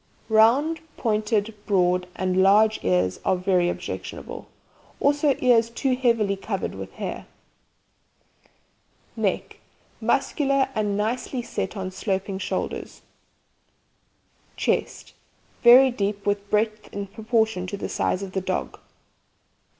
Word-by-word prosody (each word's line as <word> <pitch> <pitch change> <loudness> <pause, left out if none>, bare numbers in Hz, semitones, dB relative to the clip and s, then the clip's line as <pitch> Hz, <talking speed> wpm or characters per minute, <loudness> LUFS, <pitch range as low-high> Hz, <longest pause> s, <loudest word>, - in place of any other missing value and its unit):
Round, 250 +9 +4 0.2
pointed, 215 -1 0
broad 180 -2 +2
and 185 0 +1
large 210 +3 +5
ears 90 0 +1
are - - +2
very 180 -1 +1
objectionable, - - -6 0.5
also 285 -1 +3
ears 230 -2 +3
too 255 +2 0
heavily 230 -6 +1
covered 195 - -4
with - - -8
hair. - - -6 1.9
NECK - - -2 0.4
Muscular, 275 -3 +1
and 210 -3 -1
nicely 240 +4 -2
set 220 - -4
on 190 -1 -4
sloping 190 0 -3
shoulders. 185 - -4 1.5
CHEST - - -2 0.5
Very 255 +2 +8
deep, 200 -3 -3
with 205 0 -1
breadth 215 0 -1
in 200 0 -4
proportion 220 -2 -1
to 200 - -5
the - - -4
size 190 - -1
of 195 - -6
the 190 - -2
dog. - - -3
210 Hz, 110 wpm, -24 LUFS, 190-235 Hz, 1.9 s, Very